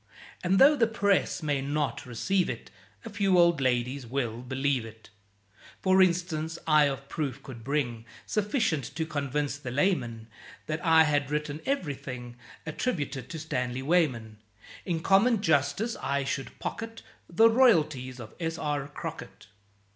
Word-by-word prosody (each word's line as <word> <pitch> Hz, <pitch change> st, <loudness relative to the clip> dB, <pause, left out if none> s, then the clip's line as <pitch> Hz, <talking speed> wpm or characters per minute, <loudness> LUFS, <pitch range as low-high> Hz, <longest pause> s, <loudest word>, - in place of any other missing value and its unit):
And 185 Hz, +2 st, +2 dB
though 285 Hz, +6 st, +7 dB
the 235 Hz, -5 st, +3 dB
Press 200 Hz, -5 st, +1 dB
may 145 Hz, -3 st, 0 dB
not 145 Hz, -1 st, -2 dB
receive 180 Hz, +10 st, 0 dB
it, -, -, -6 dB, 0.3 s
A -, -, -5 dB
few 195 Hz, -3 st, +2 dB
old 170 Hz, -4 st, +4 dB
ladies 125 Hz, +1 st, 0 dB
will 120 Hz, -2 st, -2 dB
believe 130 Hz, 0 st, -1 dB
it. 110 Hz, -1 st, -13 dB, 0.7 s
For 190 Hz, 0 st, +5 dB
instance, 170 Hz, -3 st, +1 dB
I 155 Hz, -2 st, +5 dB
of 135 Hz, -1 st, -3 dB
proof 140 Hz, -4 st, -4 dB
could 120 Hz, -4 st, -10 dB
bring 120 Hz, -4 st, -2 dB, 0.2 s
Sufficient 210 Hz, -, 0 dB
to 160 Hz, 0 st, -1 dB
convince 145 Hz, -1 st, -2 dB
the 130 Hz, -, -6 dB
layman 120 Hz, -, 0 dB, 0.4 s
That 155 Hz, +1 st, -4 dB
I 160 Hz, -2 st, +6 dB
had 145 Hz, -2 st, +1 dB
written 150 Hz, 0 st, -3 dB
ev'rything 135 Hz, -, -3 dB, 0.3 s
Attributed 145 Hz, -, -3 dB
to 165 Hz, -, -5 dB
Stanley 125 Hz, -5 st, -3 dB
Weyman. 130 Hz, -9 st, +1 dB, 0.5 s
In 170 Hz, -4 st, -1 dB
common 200 Hz, +6 st, +4 dB
justice 160 Hz, -, +1 dB
I 140 Hz, +1 st, 0 dB
should 135 Hz, 0 st, -4 dB
pocket 225 Hz, 0 st, -6 dB, 0.3 s
The 225 Hz, +7 st, +6 dB
royalties 155 Hz, -, +3 dB
of 110 Hz, -2 st, -9 dB
S. 165 Hz, -1 st, -2 dB
R. 145 Hz, -3 st, -2 dB
Crockett. 145 Hz, -7 st, -8 dB
150 Hz, 145 wpm, -28 LUFS, 130-180 Hz, 0.7 s, though